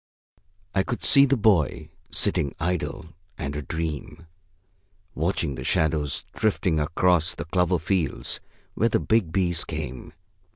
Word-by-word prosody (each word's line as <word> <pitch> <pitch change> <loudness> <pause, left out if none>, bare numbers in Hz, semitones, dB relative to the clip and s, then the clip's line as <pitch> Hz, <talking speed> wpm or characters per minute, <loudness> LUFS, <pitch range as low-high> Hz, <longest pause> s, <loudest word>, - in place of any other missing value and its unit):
I 95 - +3
could 120 +5 -4
see 140 0 +7
the 135 0 +2
boy, 100 - +2 0.2
sitting 70 - +1
idle 85 -1 -2 0.3
and 70 +1 -4
a 75 - -2
dream, 80 +2 -5 0.9
watching 85 -2 -1
the - - -6
shadows 75 -2 0
drifting 95 -6 +1
across 85 +2 +2
the - - -5
clover 90 +1 +1
fields 85 -1 -1 0.3
where 115 - +2
the - - +2
big 110 -7 +1
bees 85 -2 +1
came. 75 -6 -6
85 Hz, 130 wpm, -25 LUFS, 75-95 Hz, 0.9 s, see